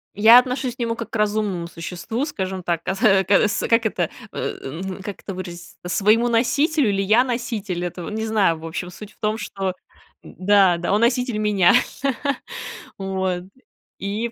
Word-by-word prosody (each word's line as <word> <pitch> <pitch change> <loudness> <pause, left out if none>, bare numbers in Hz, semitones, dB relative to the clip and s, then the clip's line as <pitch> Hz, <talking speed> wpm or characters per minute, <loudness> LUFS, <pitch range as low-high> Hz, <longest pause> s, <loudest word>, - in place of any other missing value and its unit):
Я 225 +4 +9
отношусь 250 0 -2
к - - -46
нему 230 -1 -1
как 230 - -6
к - - -7
разумному 210 -5 0
существу, 180 - -4
скажем 190 - -4
так, 170 -1 -1
каса 195 -1 +3
кас 205 +2 +2
как 230 0 +3
это, 220 - 0 0.2
э, - - -4
ну 180 +8 -5
как 205 -1 -7
это 195 - -6
выразиться, 175 -2 -8
своему 215 +6 +3
носителю 270 +3 +2
или 195 0 +1
я 215 +6 +4
носитель, 225 -8 -3
этого 175 0 -5
не 220 +1 -3
знаю. 200 -7 +2
В 165 - -9
общем, 175 +2 -4
суть 210 +3 -11
в - - -34
том, 215 +1 0
что 195 -4 -3 0.5
да, 190 -2 +3
да, 175 +3 -1
он 210 - +2
носитель 245 -1 +1
меня 205 -4 +4 1.2
вот, 190 -2 -2 0.6
и 210 +4 -2
205 Hz, 170 wpm, -22 LUFS, 185-230 Hz, 1.2 s, Я